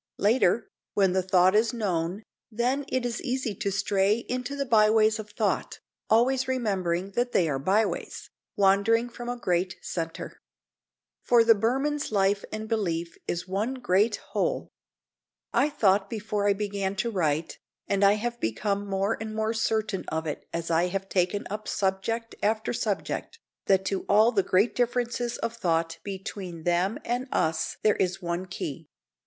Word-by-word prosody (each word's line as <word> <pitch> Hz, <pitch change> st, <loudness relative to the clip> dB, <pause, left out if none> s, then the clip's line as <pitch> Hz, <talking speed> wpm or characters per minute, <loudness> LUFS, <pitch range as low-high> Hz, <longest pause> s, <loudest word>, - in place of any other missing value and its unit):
Later, 220 Hz, 0 st, +3 dB, 0.3 s
when 195 Hz, -3 st, +3 dB
the 190 Hz, -, +2 dB
thought 185 Hz, 0 st, +4 dB
is 220 Hz, +2 st, +3 dB
known, 185 Hz, -2 st, -1 dB, 0.3 s
then 250 Hz, +5 st, 0 dB
it 255 Hz, -1 st, -1 dB
is 240 Hz, -1 st, -2 dB
easy 255 Hz, -4 st, -2 dB
to 200 Hz, -, -1 dB
stray 200 Hz, +2 st, +1 dB
into 250 Hz, +2 st, -3 dB
the 280 Hz, 0 st, -2 dB
byways 220 Hz, -1 st, +4 dB
of 215 Hz, -1 st, -7 dB
thought, -, -, -1 dB, 0.3 s
always 255 Hz, +4 st, +3 dB
remembering 195 Hz, -7 st, -1 dB
that 245 Hz, +4 st, -1 dB
they 170 Hz, -, +3 dB
are 135 Hz, -3 st, -1 dB
byways, 200 Hz, +9 st, -1 dB, 0.2 s
wandering 205 Hz, +4 st, +3 dB
from 240 Hz, 0 st, -7 dB
a 245 Hz, -, -3 dB
great 180 Hz, -4 st, 0 dB
centre. 165 Hz, -2 st, -5 dB, 0.8 s
For 235 Hz, -1 st, +5 dB
the 230 Hz, 0 st, +7 dB
Burman's 265 Hz, +7 st, 0 dB
life 200 Hz, 0 st, +2 dB
and 215 Hz, 0 st, -5 dB
belief 175 Hz, -7 st, -1 dB
is 175 Hz, +2 st, -3 dB
one 210 Hz, +8 st, -1 dB
great 210 Hz, -3 st, +2 dB, 0.2 s
whole. 195 Hz, -5 st, -1 dB, 0.8 s
I 270 Hz, +5 st, +3 dB
thought 200 Hz, -7 st, +2 dB
before 210 Hz, -2 st, -2 dB
I -, -, +5 dB
began 200 Hz, -1 st, -2 dB
to 230 Hz, +4 st, -1 dB
write, 160 Hz, -5 st, -1 dB, 0.3 s
and 200 Hz, 0 st, +1 dB
I 200 Hz, 0 st, +7 dB
have 235 Hz, +3 st, -3 dB
become 200 Hz, -, -1 dB
more 195 Hz, +2 st, 0 dB
and 220 Hz, -1 st, -5 dB
more 220 Hz, +1 st, 0 dB
certain 220 Hz, -3 st, -1 dB
of 160 Hz, 0 st, -2 dB
it 150 Hz, -, -5 dB
as 170 Hz, 0 st, -3 dB
I 165 Hz, +2 st, +3 dB
have 195 Hz, +1 st, -4 dB
taken 185 Hz, +2 st, 0 dB
up 215 Hz, +1 st, -5 dB
subject 205 Hz, +4 st, -1 dB
after 220 Hz, +3 st, 0 dB
subject, 220 Hz, -, -3 dB, 0.3 s
that 190 Hz, -1 st, +3 dB
to 195 Hz, 0 st, -2 dB
all 215 Hz, +3 st, +6 dB
the 205 Hz, -5 st, +3 dB
great 190 Hz, +5 st, +2 dB
differences 240 Hz, 0 st, -1 dB
of 230 Hz, 0 st, -3 dB
thought 165 Hz, -5 st, 0 dB
between 190 Hz, -3 st, -6 dB
them 175 Hz, +5 st, +1 dB
and 245 Hz, +2 st, -1 dB
us 160 Hz, 0 st, 0 dB
there 215 Hz, -1 st, +4 dB
is 185 Hz, 0 st, 0 dB
one 175 Hz, 0 st, -3 dB
key. 155 Hz, -6 st, -6 dB
205 Hz, 160 wpm, -27 LUFS, 185-230 Hz, 0.8 s, the